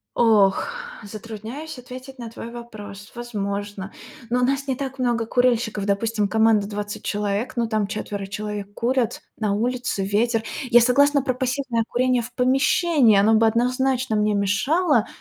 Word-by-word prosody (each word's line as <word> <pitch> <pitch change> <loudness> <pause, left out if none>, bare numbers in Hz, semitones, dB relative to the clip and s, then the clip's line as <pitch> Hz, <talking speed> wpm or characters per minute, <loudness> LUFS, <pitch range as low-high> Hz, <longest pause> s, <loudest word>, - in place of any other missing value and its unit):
Ох, 210 - +4 0.4
затрудняюсь 225 +8 -8
ответить 255 +2 -10
на 235 -2 -6
твой 230 +1 -8
вопрос. 210 -4 -10
Возможно. 205 -4 -4 0.4
Но 250 +1 +1
у - - +2
нас 275 +1 -1
не 265 - 0
так 270 0 -5
много 240 -2 +1
курильщиков. 230 -4 +1
Допустим, 210 +1 0
команда 220 -1 +3
20 205 0 -5
человек, 205 +3 -2
но 235 - +2
там 215 -3 0
4 205 -2 -5
человек 205 0 -5
курят 240 -1 0 0.2
на 210 -2 0
улице, 245 -3 -1
ветер. 225 +3 +1 0.3
Я 240 0 +7
согласна 280 +3 +4
про 255 -3 0
пассивное 255 -2 -1
курение 250 0 +2
в 240 +2 -8
помещении, 265 - +3
оно 215 +3 +4
бы 225 +1 +5
однозначно 250 +1 +1
мне 210 0 +2
мешало, 235 - +2
230 Hz, 150 wpm, -23 LUFS, 210-255 Hz, 0.4 s, Я